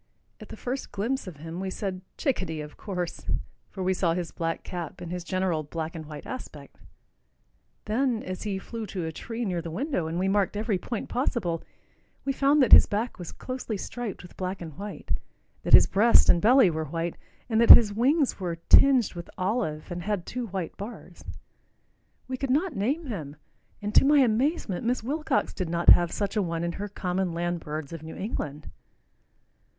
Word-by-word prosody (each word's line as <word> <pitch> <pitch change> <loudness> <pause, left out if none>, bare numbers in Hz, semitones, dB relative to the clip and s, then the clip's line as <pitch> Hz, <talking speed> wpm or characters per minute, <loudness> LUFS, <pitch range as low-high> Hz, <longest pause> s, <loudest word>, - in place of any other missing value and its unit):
At - - -12
the - - -9
first 260 +2 -4
glimpse 230 +4 -2
of 175 -5 -8
him 165 +3 -7
we 190 0 -3
said, 185 -1 -4 0.2
"Chickadee, 185 - -1
of 150 0 -9
course," 180 -4 -5 0.4
for 190 - -5
we 185 +1 +2
saw 175 -3 +1
his 175 -2 -3
black 165 -1 -3
cap 175 -4 -6
and 175 -1 -7
his 180 -1 -4
general 185 -3 0
black 160 +2 -5
and 160 -2 -7
white 150 -1 -9
aspect. 150 - -9 1.1
Then 235 +1 0
as 185 0 -5
he 205 -3 -2
flew 225 +3 -6
to 180 -3 -4
a 160 - -3
tree 230 +8 -5
near 180 -4 -1
the 165 - -6
window, 190 - -2
and 165 +1 -3
we 185 +2 +1
marked 200 0 +1
every 210 -3 0
point 230 +3 -4
possible, 205 - -1 0.6
we 275 - 0
found 280 +1 +4
that 245 - +1
his - - +10
back 220 +2 -2
was 175 - -7
closely 255 -4 -5
striped 230 0 -6
with 180 - -13
black 185 0 -4
and 160 -4 -8
white, 205 +1 -7 0.5
that - - -3
his - - +10
breast 225 +4 +5
and 170 - +6
belly 240 -3 +6
were 160 0 -3
white, 165 +3 -3 0.3
and 225 -1 +2
that 235 - +3
his 210 -3 +10
wings 270 +5 +2
were 175 -3 -2
tinged 265 -5 +6
with 175 -1 -8
olive 185 -6 -2
and 175 0 -4
had 200 -1 -2
two 250 -1 -4
white 185 -4 -4
bars. 205 +5 -9 1.0
We 255 0 -3
could 270 +1 -3
not 305 +6 +1
name 275 +12 -1
him, 160 - -6 0.5
and 210 +1 -3
to - - +7
my 290 +2 +5
amazement 240 - +1
Miss 240 0 0
Wilcox 290 +2 -1
did 185 -4 -3
not 170 0 +2
have 175 -1 +7
such 200 0 -2
a 210 - +2
one 170 -2 -2
in 170 - -1
her 205 +4 -5
"Common 185 -2 -2
Land 175 +1 -2
Birds 150 -1 -6
of 165 - -7
New 160 0 -8
England." 150 -8 -5
190 Hz, 195 wpm, -27 LUFS, 170-235 Hz, 1.1 s, his